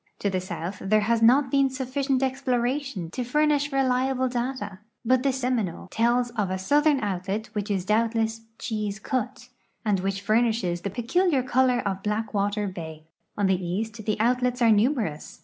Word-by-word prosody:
To 200 - 0
the 185 -1 -1
south 185 +1 -5
there 215 +2 +2
has 230 +2 +1
not 260 +4 +5
been 275 -1 +3
suffi 260 +1 -3
cient 270 -1 +1
ex})loration 260 - -1
to 250 - -3
furnish 295 +3 +1
reliable 260 -1 +1
data, 240 -5 -3 0.3
but 255 +2 +3
the 275 +1 +2
Seminole 245 -9 -2
tells 240 +2 +2
of 210 -5 -1
a 185 - -1
southern 290 +8 +3
outlet 200 +2 -3
which 210 -1 -3
is 190 -3 -1
doubtless 225 +1 +1 0.2
"Chi's 215 -3 -3
Cut," 250 +2 -3 0.4
and 205 -3 +2
which 195 +1 -2
furnishes 215 -5 +1
the 200 - -3
})eculiar 265 - +1
color 255 -1 +3
of 195 -1 -2
Black 210 +2 -2
Water 205 +1 0
bay. 160 -4 -7 0.3
On 205 - +1
the 190 -1 +1
east 215 +5 -3
the 215 0 0
outlets 250 +2 +1
are 230 -2 +5
numerous. 215 - 0
230 Hz, 170 wpm, -25 LUFS, 200-255 Hz, 0.4 s, not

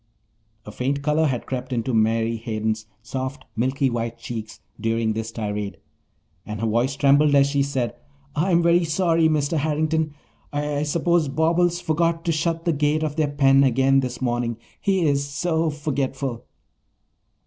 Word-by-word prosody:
A 105 - -8
faint 135 +5 -2
colour 155 +2 +2
had 125 -4 -2
crept 130 0 -4
into 120 0 -1
Mary 115 +1 +2
Hayden's 110 -1 -3 0.2
soft, 130 +4 -5
milky 130 +4 +1
white 115 -1 -2
cheeks 115 -2 -7 0.2
during 115 -1 0
this 110 +1 -4
tirade, 105 -2 -4 0.7
and 105 -1 -6
her 115 - -1
voice 120 +5 +1
trembled 145 +1 +4
as 140 0 +6
she 140 0 +1
said, 135 -4 -1 0.4
"I'm 170 +2 +2
very 170 +1 +4
sorry, 165 -1 +2
Mr. 155 +1 +1
Harrington. 155 0 0 0.4
I 145 0 -1
suppose 165 +1 +1
Bobbles 170 +4 +2
forgot 165 0 0
to 170 - +2
shut 165 +1 -1
the 170 - +2
gate 150 +1 +1
of 150 -1 -2
their 155 -2 +1
pen 135 -1 +4
again 135 +1 +4
this 130 -1 -3
morning. 120 -2 -1 0.2
He 190 -3 +1
is 140 -2 +2
so 160 +3 0
forgetful." 135 -4 -3
140 Hz, 155 wpm, -23 LUFS, 120-155 Hz, 0.7 s, as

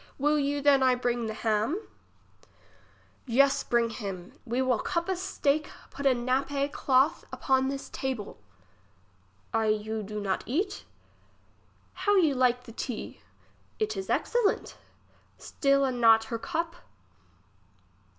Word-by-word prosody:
Will 295 +2 +2
you 285 0 0
than 280 -1 +5
I 255 -1 +4
bring 240 -2 -1
the 220 - -3
ham? 225 - 0 1.5
Yes, 275 +3 +3
bring 235 -1 +1
him, 195 -6 -6
we 240 +1 -2
will 255 -3 +2
cup 340 0 -2
a 380 - 0
steak 305 -5 0 0.2
put 280 0 -1
a 260 - +4
nappe 275 +3 0
clothe 270 +2 +2
upon 265 -1 +1
this 275 0 -5
table. 255 -6 -5 1.1
I 225 -1 +2
you 215 +1 -1
do 210 +1 -5
not 195 -2 -1
eat? 325 - -2 1.1
How 410 0 +1
you 325 -7 +4
like 250 -1 +2
the 230 - -11
tea. 235 0 -6 0.6
It 430 -1 -1
is 385 - -5
excellent. 475 -4 0 0.6
Still 275 -1 +1
a 265 - 0
not 225 -2 +5
her 230 - -1
cup. 335 +6 -3
260 Hz, 130 wpm, -28 LUFS, 230-285 Hz, 1.5 s, than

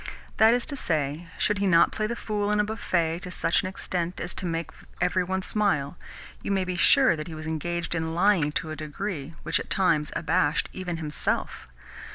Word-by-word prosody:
That 220 +2 +6
is 245 - -1
to 290 - -1
say, 155 - -1
should 210 0 +1
he 200 - +1
not 170 -2 +5
play 215 - -1
the 235 - -3
fool 210 -3 -2
in 210 0 +2
a - - +4
buffet 175 -6 -1
to 180 - -8
such 170 -1 +1
an 185 - -4
extent 180 -2 -3
as - - -3
to 185 - -3
make 165 0 -3 0.3
every 180 +1 +2
one 190 +1 -2
smile, 180 -10 0 0.5
you - - -5
may 195 -1 +1
be 180 0 -3
sure 260 +4 +5
that 155 -1 -6
he 165 - -7
was 155 0 -7
engaged 170 +2 -2
in 160 -1 -2
lying 175 -5 +3
to 155 - -2
a - - -4
degree 155 0 -5
which 155 -1 +1
at - - -7
times 165 -6 +2
abashed 160 -1 +1
even 180 -2 -4
himself. 150 -2 -1
175 Hz, 205 wpm, -26 LUFS, 160-200 Hz, 0.5 s, That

